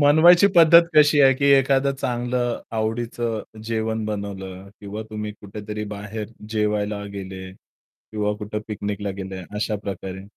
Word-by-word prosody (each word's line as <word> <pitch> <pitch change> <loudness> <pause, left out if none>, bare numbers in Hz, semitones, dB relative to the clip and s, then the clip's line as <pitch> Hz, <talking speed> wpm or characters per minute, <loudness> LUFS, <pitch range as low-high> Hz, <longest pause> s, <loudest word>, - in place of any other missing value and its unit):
मनवायची 165 +6 +7
पद्धत 170 +1 +8
कशी 150 -1 +6
आहे? 135 -1 +6
की 140 - -2
एखादं 135 0 +3
चांगलं 120 -1 -2 0.2
आवडीचं 115 0 -3
जेवण 110 -1 -2
बनवलं 100 -2 -6
किंवा 105 +1 -6
तुम्ही 105 0 -5
कुठेतरी 105 +1 -6
बाहेर 105 +1 -6 0.2
जेवायला 105 -1 -1
गेले 95 -1 -7
किंवा 105 +2 -6
कुठे 105 0 -5
पिकनिकला 100 -1 -3
गेले 95 -1 -6
अशा 105 0 -1
प्रकारे? 95 -1 -6
105 Hz, 125 wpm, -23 LUFS, 100-120 Hz, 0.2 s, पद्धत